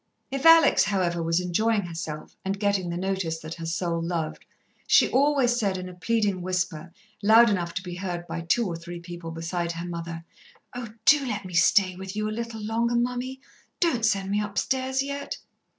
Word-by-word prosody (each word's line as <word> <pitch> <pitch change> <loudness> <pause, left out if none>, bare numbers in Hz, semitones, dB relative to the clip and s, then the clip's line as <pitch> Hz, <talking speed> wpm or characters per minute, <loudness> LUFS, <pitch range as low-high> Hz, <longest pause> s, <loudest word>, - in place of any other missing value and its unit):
If 275 +3 +1
Alex, 330 0 +7
however, 180 -4 0
was 165 +1 +1
enjoying 205 +4 +1
herself, 165 -3 -6
and 195 +1 -2
getting 200 -3 +1
the 170 - -3
notice 190 -3 -2
that 160 0 -7
her 165 -1 -6
soul 170 0 -1
loved, 165 -2 -3 0.4
she - - +6
always 270 -3 +3
said 195 -4 0
in 185 0 -6
a 180 - -9
pleading 200 +1 0
whisper, 175 -2 -2 0.3
loud 225 +2 +6
enough 170 -4 -2
to 180 - -3
be 180 -1 -6
heard 175 -2 -4
by 170 - -5
two 195 +8 +1
or 175 -4 -3
three 170 +1 -8
people 170 -1 -8
besides 170 +1 -3
her 170 +1 -5
mother: 165 -1 -6 0.5
"Oh, 245 -2 -6 0.2
do 295 -1 +6
let 210 -4 -3
me 185 - -8
stay 185 +2 +4
with 190 +1 -7
you 215 0 -1
a - - -3
little 230 -1 -5
longer, 235 +2 0
mummy. 250 +2 -2 0.4
Don't 270 -10 +1
send 200 -3 +1
me 205 +1 +1
upstairs 260 +6 -1
yet!" 280 0 -5
190 Hz, 190 wpm, -26 LUFS, 170-230 Hz, 0.5 s, Alex